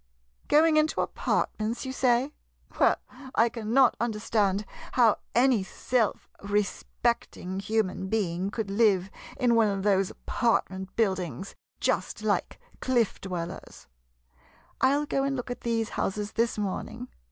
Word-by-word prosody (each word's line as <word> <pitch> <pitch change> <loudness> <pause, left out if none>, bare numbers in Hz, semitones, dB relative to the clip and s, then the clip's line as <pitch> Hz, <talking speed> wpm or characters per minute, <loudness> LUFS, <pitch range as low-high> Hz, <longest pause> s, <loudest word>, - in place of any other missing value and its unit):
Going 310 +1 +5
into 310 0 +2
apart - - 0
ments, 225 +4 -2
you 260 - -4
say? 255 +2 +2 0.5
Well, - - +5 0.4
I 230 +1 +4
cannot 235 +3 +3
understand 210 -3 0 0.3
how 235 -4 +4 0.2
any 245 -2 +4
self 225 +3 -1
respecting 205 -1 -2
human 200 -2 -1
being 190 -3 -1
could 205 -1 -4
live 200 -3 +3 0.3
in 245 -1 +3
one 225 -2 +4
of 195 -2 -1
those 195 -2 +3
apartment 190 -5 -1
buildings, 190 - -1 0.3
just - - -1
like - - -1 0.2
cliff 240 -5 +1
dwellers! 180 -1 -6 1.0
I 260 - +6
'11 290 +2 +1
go 270 - 0
and 275 0 0
look 245 -1 -4
at 245 - -6
these 225 -2 -1
houses 205 +2 -2
this 230 -1 0
morning. 205 -3 -4
220 Hz, 130 wpm, -27 LUFS, 195-240 Hz, 1.0 s, I